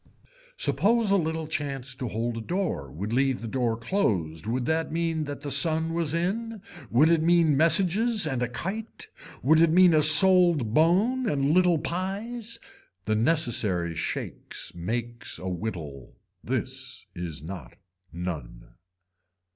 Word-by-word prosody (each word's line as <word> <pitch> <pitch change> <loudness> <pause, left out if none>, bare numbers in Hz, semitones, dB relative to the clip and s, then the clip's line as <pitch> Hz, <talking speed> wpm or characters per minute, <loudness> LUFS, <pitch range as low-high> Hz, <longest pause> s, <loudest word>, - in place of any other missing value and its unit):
Suppose 225 0 +1
a - - +4
little 160 -3 -2
chance 140 -4 -4
to 130 -1 -6
hold 115 +2 -3
a - - -5
door 170 - -3
would 100 - -6
leave 135 0 +1
the 115 - -7
door 115 -1 -1
closed 100 - -2
would 120 +2 -2
that 160 +1 -1
mean 165 -1 -2
that 145 -1 -7
the 145 - -5
sun 160 +3 +1
was 165 -3 -1
in, 210 +7 -3 0.3
would 135 +7 +4
it 165 -1 +3
mean 165 -2 +3
messages 195 - +2
and 130 -5 -2
a 125 - 0
kite, 195 - -6 0.3
would 160 +4 +4
it 165 - +5
mean 180 +1 +5
a 155 - +4
sold 160 - +6
bone 205 - +2
and 140 0 0
little 180 -1 +3
pies. 210 +8 -5 0.5
The 110 - 0
necessary 110 - +2
shakes 80 - -3
makes 120 +7 -4
a 95 - -7
whittle. 85 - -6 0.3
This - - -4
is 85 -4 -6
not 90 +3 -9 0.4
none. 80 -9 -7
150 Hz, 145 wpm, -26 LUFS, 115-175 Hz, 0.5 s, sold